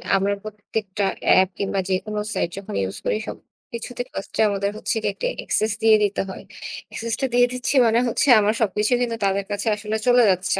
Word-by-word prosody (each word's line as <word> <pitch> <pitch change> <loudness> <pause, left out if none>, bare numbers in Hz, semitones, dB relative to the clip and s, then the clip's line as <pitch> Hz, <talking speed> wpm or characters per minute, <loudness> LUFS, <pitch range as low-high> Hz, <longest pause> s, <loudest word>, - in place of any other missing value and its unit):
আমরা 195 +1 +1
প্রত্যেকটা 210 -1 -4 0.2
অ্যাপ 190 0 +6
কিংবা 195 0 -1
যেকোনো 210 +3 -1
সাইট - - 0
যখন 195 - -7
ইউজ 95 0 -4
করি, - - +1
সবকিছুতে 235 +1 -8
ফাস্টে 195 - -3
আমাদের 200 0 -1
হচ্ছে - - -1
গিয়ে 205 - 0
একটি - - -2
অ্যাক্সেস 215 0 +1
দিয়ে 220 -1 +7
দিতে 205 0 0
হয়। 190 - -8 0.5
অ্যাক্সেসটা 230 +3 -2
দিয়ে 245 0 +5
দিচ্ছি 250 +3 -1
মানে 230 +1 +3
হচ্ছে, 235 - +1
আমার 210 +1 +2
সবকিছু 210 +1 +1
কিন্তু 235 -2 -1
তাদের 195 0 0
কাছে 205 +3 -2
আসলে 210 +1 -4
চলে 245 0 +6
যাচ্ছে। 185 +1 0
210 Hz, 180 wpm, -22 LUFS, 195-230 Hz, 0.5 s, দিয়ে